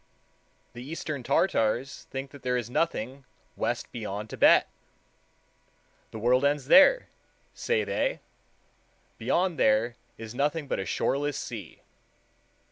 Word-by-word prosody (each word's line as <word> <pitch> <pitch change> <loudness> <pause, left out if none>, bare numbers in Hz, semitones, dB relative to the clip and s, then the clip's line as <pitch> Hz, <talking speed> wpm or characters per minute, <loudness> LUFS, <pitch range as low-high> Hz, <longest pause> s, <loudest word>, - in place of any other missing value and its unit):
The 120 - -9
eastern 155 -1 -5
Tartars 130 - 0
think 135 0 -6
that 140 - -13
there 125 0 0
is 120 -1 -4
nothing 135 -4 -2 0.3
west - - -2
beyond 105 -2 -5
Thibet. - - +5 1.4
"The - - -8
world 125 +4 +2
ends 140 -1 0
there," 290 - +7 0.4
say 470 -2 0
they; - - -1 1.0
"beyond 180 -2 0
there 115 +3 +2 0.2
is 110 0 -8
nothing 145 +3 -1
but - - -2
a 95 - -4
shoreless 145 0 -1
sea." - - -7
135 Hz, 120 wpm, -27 LUFS, 120-155 Hz, 1.4 s, there